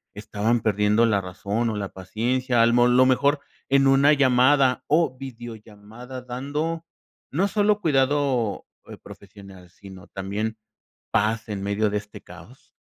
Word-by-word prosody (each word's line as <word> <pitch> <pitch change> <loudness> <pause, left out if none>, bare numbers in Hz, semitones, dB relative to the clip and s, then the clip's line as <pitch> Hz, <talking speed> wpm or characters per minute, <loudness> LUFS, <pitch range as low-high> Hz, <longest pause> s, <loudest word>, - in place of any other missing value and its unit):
estaban 110 +3 -1
perdiendo 105 +1 +2
la 105 -4 +1
razón 100 +5 -3
o 110 - -3
la 100 -1 -4
paciencia, 120 +6 -1
al 115 0 +3
mo 120 0 +4
lo 125 +1 +4
mejor 140 +3 +2 0.3
en 135 0 +4
una 140 +2 +5
llamada 130 -1 +3
o 155 -4 +2
videollamada, 120 -1 -10
dando 145 +6 -4 0.5
no 185 +8 +1
solo 210 0 +1
cuidado, 135 - 0 0.2
eh, - - -10
profesional, 100 -3 -14
sino 95 +1 -14
también 105 +3 -4 0.5
paz 110 +1 0
en 100 -2 -4
medio 100 +2 0
de 105 - -1
este 105 0 -9
caos? 90 +8 -15
120 Hz, 140 wpm, -23 LUFS, 105-135 Hz, 0.5 s, una